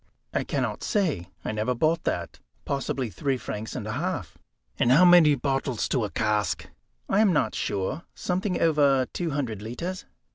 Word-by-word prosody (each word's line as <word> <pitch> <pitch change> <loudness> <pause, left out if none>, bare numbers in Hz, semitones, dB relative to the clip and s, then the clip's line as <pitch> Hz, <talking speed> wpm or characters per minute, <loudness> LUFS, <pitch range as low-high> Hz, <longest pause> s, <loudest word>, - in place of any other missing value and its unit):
"I - - +1
cannot - - -2
say; 155 - 0 0.2
I - - -1
never 110 +4 -1
bought 160 +6 +1
that. - - -2 0.3
Possibly 135 -3 -2
three 135 - -1
francs 110 -2 -6
and - - -4
a - - -3
half." - - -3 0.4
"And 120 - +4
how 160 +8 +7
many 175 -4 +7
bottles 135 -2 -1
to 125 - +1
a 105 - -2
cask?" 105 -1 0 0.4
"I 195 - +2
am 215 -3 +5
not 130 -9 +1
sure, 100 - -2
something 185 0 -1
over 145 -5 +4
two 175 -2 -2
hundred 130 -8 -3
litres." 170 - -5
135 Hz, 170 wpm, -26 LUFS, 110-165 Hz, 0.4 s, how